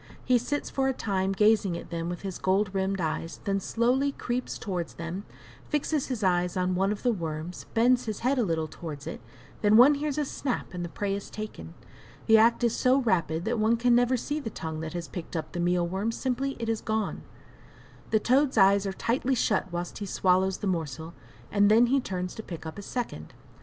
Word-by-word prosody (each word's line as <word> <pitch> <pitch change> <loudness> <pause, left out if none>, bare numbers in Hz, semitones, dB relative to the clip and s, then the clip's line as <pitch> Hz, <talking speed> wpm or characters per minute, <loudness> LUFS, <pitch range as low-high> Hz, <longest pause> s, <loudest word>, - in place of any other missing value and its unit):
He 250 -1 +4
sits 290 +5 -2
for 270 -1 +1
a 265 - +1
time 195 -5 -1
gazing 205 -3 +3
at - - -10
them 170 0 -3
with 175 +2 -6
his 190 -2 -5
gold 190 +1 +1
rimmed 195 0 0
eyes; 160 0 -3
then 195 -2 0
slowly 250 +7 +1
creeps 245 -1 -3
towards 180 -6 -4
them, 170 +5 -5 0.4
fixes 295 -1 0
his 245 -5 -3
eyes 180 -1 +1
on 185 0 +1
one 195 +2 +1
of 210 - -4
the 245 - +3
worms 165 -2 -5
bends 245 +2 +4
his 215 -3 -4
head 255 +3 +2
a - - +3
little 165 -5 -1
towards 155 -2 -8
it, - - -6 0.4
then 210 +1 +5
one 260 +5 +8
hears 290 0 -2
a 300 - +1
snap 265 -5 -3
and 175 -1 -4
the 170 - -4
prey 200 +3 -2
is 200 0 -5
taken. 85 - -7 0.5
The 220 0 +6
act 230 +2 +4
is 235 -1 +2
so 255 +1 +3
rapid 170 - 0
that 230 0 0
one 220 +2 +3
can 245 +1 +3
never 245 +1 +4
see 295 +5 -3
the 240 - -5
tongue 160 -6 -5
that 160 +1 -5
has 175 -1 -4
picked 175 -1 -7
up 155 -1 -3
the 175 - -4
meal 175 0 +2
worm 195 +6 -1
simply 265 +3 -2
it 230 - -4
is 225 -1 -1
gone! 220 -1 -2 0.9
The 220 - +3
toad's 260 +3 +2
eyes 200 0 +5
are 195 - -2
tightly 250 +6 0
shut 210 -5 +1
whilst 175 0 -4
he 205 - -4
swallows 190 0 +2
the - - -5
morsel, 160 -3 -3 0.4
and 205 0 +4
then 225 +3 +6
he 270 +3 +3
turns 180 -7 -4
to - - -6
pick 170 -6 -8
up 160 +5 -6
a - - -5
second. 200 - -5
200 Hz, 220 wpm, -28 LUFS, 175-240 Hz, 0.9 s, one